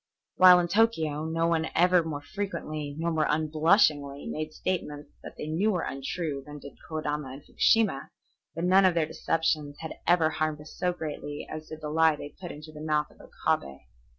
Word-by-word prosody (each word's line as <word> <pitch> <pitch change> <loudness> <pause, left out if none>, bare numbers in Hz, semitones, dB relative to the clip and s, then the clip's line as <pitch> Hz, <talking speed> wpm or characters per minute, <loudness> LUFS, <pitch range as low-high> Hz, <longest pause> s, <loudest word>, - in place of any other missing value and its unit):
While 185 -1 +9
in 175 - 0
Tokio 165 -7 +1
no 165 +1 0
one 165 -1 +1
ever 180 +1 +5
more 150 -3 -5
frequently, 155 -6 -5
nor 170 +1 -1
more 155 -2 +1
unblushingly, 155 -2 +2
made 155 0 -4
statements 150 -4 -4
that - - -10
they - - -5
knew 165 +8 +1
were 180 -5 0
untrue 140 +2 -4
than 150 +1 -10
did 140 -1 -12
Kodama 150 -3 -3
and 140 +2 -11
Fukushima, 215 -12 +2 0.5
but 165 - -3
none 190 +2 +5
of 185 -2 +3
their 165 -2 +2
deceptions 155 -2 -1
had 160 - -5
ever 165 -2 +4
harmed 155 -1 -1
us 150 0 -12
so 180 -1 0
greatly 150 -3 -6
as 155 0 -7
did 155 0 -8
the 150 - -4
lie 160 0 +4
they 145 - -8
put 175 +4 -9
into 150 +1 -10
the 150 -1 -10
mouth 150 -1 0
of - - -18
Okabe. 70 0 -2
155 Hz, 190 wpm, -28 LUFS, 150-170 Hz, 0.5 s, While